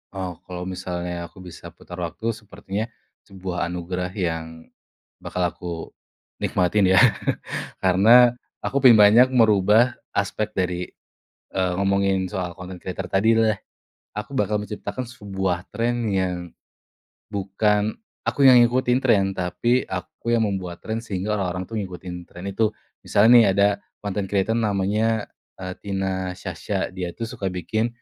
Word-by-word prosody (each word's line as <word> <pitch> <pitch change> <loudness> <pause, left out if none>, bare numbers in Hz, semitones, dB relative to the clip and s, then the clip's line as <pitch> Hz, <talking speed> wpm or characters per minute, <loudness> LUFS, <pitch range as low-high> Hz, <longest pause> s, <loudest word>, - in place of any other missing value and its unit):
Oh 90 -3 -5
kalau 90 -1 -5
misalnya 90 -1 -4
aku 90 +2 -14
bisa 85 -1 -10
putar 90 +1 -11
waktu, 100 +7 -2
sepertinya 105 -1 -5 0.4
sebuah 95 -3 -4
anugerah 90 +1 -3
yang 80 -3 -3 0.6
bakal 90 - -3
aku 90 0 -3 0.7
nikmatin 95 +2 +2
ya. - - +7 0.8
Karena 110 +7 +7 0.3
aku 140 - 0
ingin 120 - +9
banyak 115 +5 +7
merubah 110 +1 +5 0.2
aspek 105 +2 -1
dari, 90 -1 -1 0.7
eee, 95 -1 0
ngomongin 100 -1 +1
soal 90 -2 -4
content 90 -1 -9
creator 95 0 -5
tadi 110 +5 +3
deh. 110 -2 +3 0.6
Aku 105 +6 -4
bakal 105 0 +1
menciptakan 105 +4 -5
sebuah 95 -6 -3
tren 120 +1 0
yang 95 -1 +1 1.0
bukan, 105 +2 +1 0.3
aku 140 - +2
yang 125 -2 +9
ngikutin 125 +1 +2
tren, 110 -7 +4
tapi 120 +8 +1
aku 95 +5 -5
yang 110 - +2
membuat 90 -4 -4
tren, 115 +1 -2
sehingga 105 -1 -2
orang-orang 90 -2 -2
tuh 115 - -9
ngikutin 90 -2 -8
tren 90 +2 -9
itu. 105 +2 +1 0.3
Misal 100 +2 +3
nih 115 -4 +8
ada 100 0 +2 0.2
content 100 -1 -3
creator 100 +2 +1
namanya, 105 0 +1 0.6
Tina 95 -2 -2
Sasha, - - -4
dia 90 -2 -4
tuh 115 - -3
suka 100 -4 -4
bikin, 110 +5 -1
95 Hz, 135 wpm, -23 LUFS, 90-110 Hz, 1.0 s, ingin